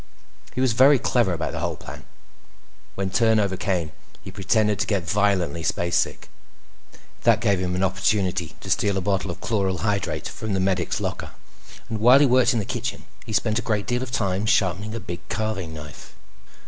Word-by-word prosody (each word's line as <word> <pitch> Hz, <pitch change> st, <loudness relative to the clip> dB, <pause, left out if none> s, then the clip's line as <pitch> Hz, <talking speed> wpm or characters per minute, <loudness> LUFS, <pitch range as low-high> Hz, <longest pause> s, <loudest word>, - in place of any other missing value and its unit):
He 130 Hz, -, 0 dB
was 130 Hz, -3 st, +2 dB
very 135 Hz, +4 st, +6 dB
clever -, -, +1 dB
about -, -, -2 dB
the -, -, -4 dB
whole -, -, -2 dB
plan. -, -, -10 dB, 0.9 s
When 95 Hz, -1 st, -2 dB
turn 110 Hz, +2 st, +3 dB
over 100 Hz, -2 st, 0 dB
came, 90 Hz, -5 st, -2 dB, 0.3 s
he 95 Hz, -, -8 dB
pretended 105 Hz, +2 st, +1 dB
to -, -, 0 dB
get 95 Hz, -6 st, -1 dB
violently 95 Hz, -3 st, +1 dB
spacesick. 85 Hz, +1 st, -1 dB, 0.9 s
That 115 Hz, -2 st, +4 dB
gave 100 Hz, -5 st, +2 dB
him 90 Hz, -1 st, -1 dB
an 95 Hz, -, 0 dB
opportunity 95 Hz, -2 st, 0 dB
to -, -, -5 dB
steal 100 Hz, -2 st, +1 dB
a -, -, 0 dB
bottle 95 Hz, 0 st, -1 dB
of 85 Hz, -, -6 dB
chloral 95 Hz, -5 st, 0 dB
hydrate 100 Hz, -3 st, -1 dB
from 110 Hz, -2 st, -5 dB
the -, -, 0 dB
medic's 95 Hz, -2 st, 0 dB
locker. -, -, -4 dB, 0.6 s
And, 110 Hz, -2 st, -4 dB
while 125 Hz, +5 st, +7 dB
he 145 Hz, -, +5 dB
worked 125 Hz, -1 st, +4 dB
in 120 Hz, -, 0 dB
the 105 Hz, -, -1 dB
kitchen, -, -, -4 dB, 0.2 s
he 110 Hz, -, -5 dB
spent 110 Hz, +1 st, +1 dB
a -, -, -3 dB
great 105 Hz, -2 st, -1 dB
deal 125 Hz, 0 st, -1 dB
of 130 Hz, -, -4 dB
time 100 Hz, -4 st, -1 dB
sharpening 105 Hz, 0 st, +1 dB
a -, -, -3 dB
big 90 Hz, -3 st, -6 dB
carving 110 Hz, -7 st, -2 dB
knife. 75 Hz, -1 st, -11 dB
100 Hz, 190 wpm, -24 LUFS, 95-110 Hz, 0.9 s, while